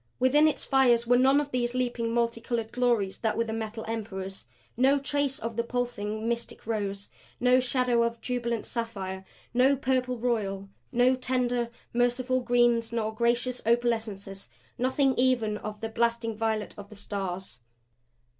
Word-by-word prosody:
Within 285 +5 +5
its 310 - -1
fires 245 -4 +4
were 245 +1 +4
none 270 +2 +5
of 290 -1 -3
those 245 -1 -1
leaping, 240 -2 -1
multicolored 230 -1 -1
glories 235 -6 +1
that 220 -1 0
were 230 - +2
the 225 -1 -4
Metal 220 0 -4
Emperor's; 195 -4 -5 0.3
no 265 +4 +4
trace 280 -1 -1
of 230 0 -5
the 235 - +2
pulsing, 230 -3 -3
mystic 235 0 -3
rose; 200 -3 -3 0.3
no 250 +1 +5
shadow 250 -2 +2
of 235 0 0
jubilant 235 -2 -2
sapphire; 195 -5 -4 0.3
no 260 +3 +4
purple 255 -2 0
royal; 205 -5 -1 0.2
no 250 +1 +4
tender, 250 -2 0 0.2
merciful 245 +2 +2
greens 240 -2 +2
nor 220 -2 -1
gracious 240 +2 0
opalescences. 220 - -1 0.3
Nothing 260 +2 +2
even 240 -4 +2
of 210 -1 -7
the 225 - -2
blasting 230 0 0
violet 220 -1 -1
of 200 0 -10
the 215 - -12
Stars. 190 - -5
235 Hz, 150 wpm, -28 LUFS, 220-250 Hz, 0.3 s, Within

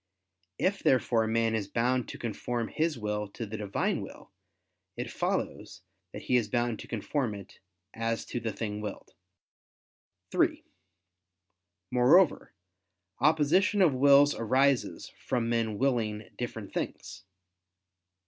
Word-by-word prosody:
If 195 +1 0
therefore 120 -3 +2
man 115 0 +1
is 105 -3 -1
bound 125 +4 0
to - - -7
conform 120 +1 -3
his 160 -3 -1
will 105 -1 -2
to 115 - -5
the 110 +1 -7
Divine 105 -2 -1
will, - - -11 0.7
it - - -4
follows 90 -1 -3 0.3
that - - -8
he 125 - +3
is 115 -3 0
bound 120 -1 0
to - - -9
conform 115 0 -2
it, 100 -2 -12 0.3
as 115 0 -2
to 120 - -4
the 115 -1 -3
thing 105 -1 -4
willed. 105 -2 -7 1.2
(3) - - +1 1.3
Moreover, 140 +8 +4 0.7
opposition 160 - +3
of 160 -6 +4
wills 140 +2 +6
arises 130 +3 +1
from 115 -2 -1
men 115 -3 0
willing 110 -5 -1
different 115 -4 -6
things. - - -5
120 Hz, 125 wpm, -29 LUFS, 110-135 Hz, 1.3 s, wills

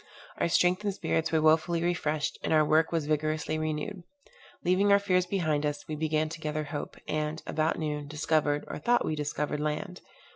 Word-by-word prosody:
Our - - +2
strength 180 +3 +3
and 205 - +1
spirits 165 -4 -1
were 160 -1 +2
wonderfully 165 +2 +3
refreshed, 155 -3 -1
and - - -1
our 155 -1 +5
work 155 +2 +3
was 165 -3 0
vigorously 155 +1 -1
renewed. 155 +5 -3 0.6
Leaving 190 +3 +3
our 200 - +8
fears 185 -3 +1
behind 160 -6 0
us, 145 -1 -3
we 155 - -3
began 155 0 0
to 165 0 -8
gather 155 0 -2
hope, 145 0 -6
and, 155 +1 -2
about 155 +1 0
noon, 150 -2 -3
discovered, 150 0 0
or - - -5
thought 240 +7 +3
that - - -1
we 155 - -1
discovered, 150 0 -2
land. 155 +5 -3
155 Hz, 190 wpm, -29 LUFS, 150-175 Hz, 0.6 s, our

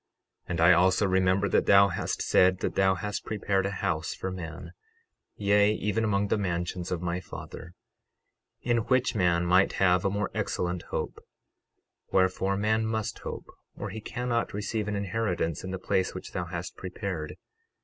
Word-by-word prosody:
12:32 - - -24
And 85 -2 -1
I 85 +2 +7
also 95 +3 +4
remember 95 +1 +2
that - - +2
thou 100 0 +7
hast - - -2
said 95 0 +4
that - - -1
thou 95 -1 +3
hast 105 +2 -4
prepared 100 -2 0
a 100 -1 -5
house 80 +1 -1
for 95 - -4
man, 85 -1 -7 0.6
yea, 105 +1 +3
even 105 +2 -1
among 100 -1 +1
the 105 - +1
mansions 90 -1 -2
of 90 -2 -2
thy 85 0 -2
Father, 90 -1 -9 0.9
in 120 -1 +2
which 130 -1 +2
man 90 -5 +2
might 90 +2 +4
have 90 -1 +3
a 100 - +2
more 100 0 -2
excellent 90 -1 -2
hope; - - -4 0.9
wherefore 95 +1 +2
man 110 +2 +1
must 110 -1 -2
hope, - - -6 0.3
or 100 - -5
he 110 +2 -6
cannot 120 -1 -2
receive 105 +1 -2
an 105 - -2
inheritance 100 -5 -1
in 95 - -5
the 95 - -3
place 95 0 -1
which 95 - -7
thou 90 - -3
hast 85 0 -6
prepared. 90 -4 -5
95 Hz, 170 wpm, -28 LUFS, 90-105 Hz, 0.9 s, I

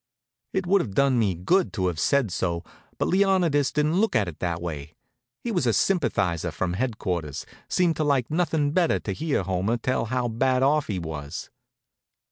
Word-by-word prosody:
It 190 -1 -1
would 195 +2 +4
have 100 - -6
done 135 -3 +3
me 100 -5 +1
good 175 - +1
to 95 -3 -1
have 90 -3 -1
said 140 - +2
so, 85 -1 -2 0.3
but - - 0
Leonidas 180 -7 +2
didn't 155 +5 +1
look 225 - +1
at 105 -4 +2
it - - -3
in - - -17
that 85 -2 -2
way. 75 -3 -6 0.5
He 235 - -2
was 175 - 0
a 115 - +3
sympathizer 95 - +1
from 90 +2 -2
headquarters; 90 - -3 0.2
seemed 175 -3 +2
to 155 - +1
like 140 -4 +1
nothin' 160 -3 +1
better'n 175 +1 +2
to 100 - -3
hear 145 - -1
Homer 95 +5 0
tell 120 0 -1
how 125 +1 -1
bad 130 +3 +1
off 150 +2 +2
he 100 - -2
was. 75 -4 -6
120 Hz, 190 wpm, -25 LUFS, -, 0.5 s, would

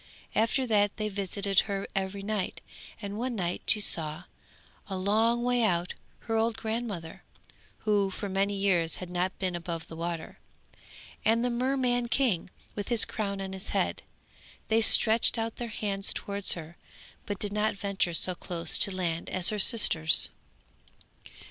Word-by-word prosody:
After 230 +4 +1
that 205 -3 +1
they 215 -1 -2
visited 200 0 +1
her 195 -1 -3
every 195 +1 -3
night, 205 -2 -3 0.4
and 200 +1 -5
one 250 0 -3
night 180 -3 -3
she 215 - +4
saw, 160 -4 +1 0.6
a 190 - -5
long 220 +5 +1
way 245 0 +1
out, 180 -5 0 0.3
her 225 - -4
old 225 0 0
grandmother 220 -7 -5 0.6
(who 205 -2 +1
for 200 +2 -6
many 195 +1 -1
years 185 -5 +1
had 180 -1 -8
not 180 +1 -2
been 185 -2 -3
above 170 -1 -6
the 160 - -10
water), 165 0 -6 0.8
and 230 +2 +2
the 245 - -1
Merman 245 -1 0
King 235 -9 0 0.2
with 205 -1 -6
his 235 -2 +4
crown 200 -3 -4
on 190 0 -6
his 190 +1 -4
head; - - -1 0.7
they 225 +1 +3
stretched 225 +1 +6
out 225 0 -3
their 240 - -5
hands 200 -3 -2
towards 200 -1 +1
her, 170 0 -10 0.5
but 205 - -3
did 205 +1 -2
not 210 0 0
venture 195 -4 -2
so 185 - +4
close 170 -1 -1
to - - +4
land 175 -3 -3
as 185 -2 +1
her 215 - -3
sisters. 175 -8 +7
200 Hz, 160 wpm, -28 LUFS, 180-225 Hz, 0.8 s, sisters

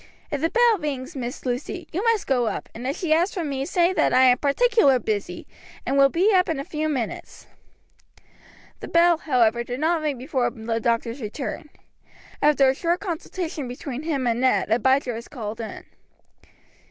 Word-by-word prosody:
If 285 - -2
the 325 - +1
bell 470 -2 +3
rings, 285 0 -4
Miss 245 -1 -6
Lucy, 255 +8 -4
you 365 +6 -2
must 460 -3 +2
go 245 -3 +1
up, - - -4
and 240 +3 -6
if 275 - -2
she 330 -4 +1
asks 345 +6 +1
for 355 - -2
me, 275 -3 -3
say 355 +1 +2
that - - +2
I 255 - +6
am 250 -1 +5
particular 285 - +3
busy, 205 -6 -3 0.4
and 265 - -1
will 275 0 +6
be 375 +8 +2
up 365 -2 +3
in 320 -4 -1
a - - -3
few 310 +1 -3
minutes." 255 -7 -5 1.3
The - - -7
bell, 340 -1 +4
however, 235 -6 +2
did 245 +2 -5
not 325 +2 +1
ring 295 -3 -2
before 260 -1 -1
the 225 -1 -3
doctor's 230 +2 -1
return. 255 +7 -5 0.7
After 290 -2 +4
a 260 - +4
short 340 +5 -1
consultation 335 -5 -5
between 250 +2 -6
him 300 -5 -2
and 235 0 0
Ned, 255 -4 +2
Abijah 255 +2 +2
was 230 +1 -7
called 225 -4 -6
in. 220 - -7
"Mr. - - -30
275 Hz, 190 wpm, -24 LUFS, 245-330 Hz, 1.3 s, I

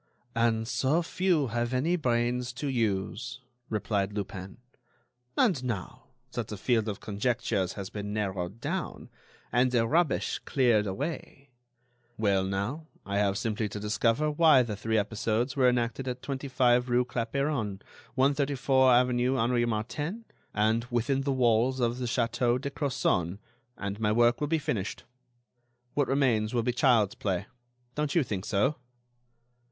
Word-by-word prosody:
"And 115 -1 +1
so 140 +6 +1
few 170 -6 +1
have 120 +2 -1
any 160 +8 +2
brains 125 -3 0
to 125 +5 -5
use," 115 +1 -1 0.3
replied 105 -2 -1
Lupin. 95 -2 -6 0.8
"And, 180 - +3
now, 115 -7 -5 0.3
that - - -3
the 105 - -6
field 110 +1 +1
of 105 -3 -3
conjectures 105 -3 -1
has 100 -2 -6
been 105 -1 -5
narrowed 100 -1 -3
down, - - -4 0.4
and 125 +1 +3
the 120 -2 +2
rubbish 160 +4 +1
cleared 120 -6 +2
away——" 140 - -5 0.7
"Well, 100 -3 +2
now, 100 +12 -3 0.2
I 100 0 -1
have 100 -1 +1
simply 110 -1 -1
to 105 - -6
discover 115 +7 +1
why 150 -4 +6
the 110 -3 -4
three 110 +2 -1
episodes 110 +4 0
were 130 -3 +5
enacted 125 +2 -1
at 125 0 -4
25 130 -3 +1
rue 125 +1 +3
Clapeyron, 120 -3 -2 0.4
134 135 -1 +3
avenue 125 +1 +3
Henri 120 0 +2
Martin, 145 - -3 0.3
and 110 +2 +1
within 125 +3 0
the 140 0 -1
walls 125 0 +2
of 120 0 0
the 125 - -2
Château 120 +1 +1
de 140 +1 -4
Crozon 130 - 0 0.4
and 100 +1 -4
my 105 -1 +1
work 120 +3 +3
will 150 - +1
be 160 +2 +2
finished. 105 -9 -3 0.9
What 145 -2 +1
remains 125 -5 +1
will 120 - +2
be 125 - 0
child's 120 -6 +3
play. 95 -1 -2 0.5
Don't 150 0 -2
you 170 - +4
think 100 -5 -4
so?" 105 +9 +1
120 Hz, 145 wpm, -29 LUFS, 105-135 Hz, 0.9 s, why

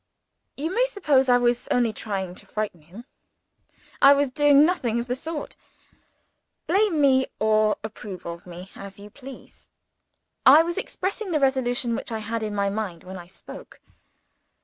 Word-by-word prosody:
You 320 +6 -3
may - - +3
suppose 295 - +2
I 245 - +6
was 245 0 0
only 240 -3 +1
trying 195 -4 -4
to - - -13
frighten 210 -6 -4
him. 185 +10 -13 1.0
I 275 - +9
was 280 -2 0
doing 290 +1 +5
nothing 250 -10 0
of 235 - -3
the 250 0 -2
sort. 310 +3 -6 1.1
Blame 395 -5 +2
me, 265 -2 +4
or 215 0 +2
approve 205 -4 -8
of 170 +1 -8
me, 180 +2 -10
as 195 0 -10
you 205 +1 -12
please, 270 +1 -13 0.7
I 295 +5 +8
was 345 +3 -2
expressing 400 +1 -4
the 315 -3 +1
resolution 255 -3 0
which 235 - -5
I 225 - -2
had 225 +1 -4
in 210 -1 -3
my 200 0 +1
mind 200 -5 -4
when 185 +1 -8
I 175 - -11
spoke. 185 - -12
240 Hz, 165 wpm, -24 LUFS, 205-285 Hz, 1.1 s, I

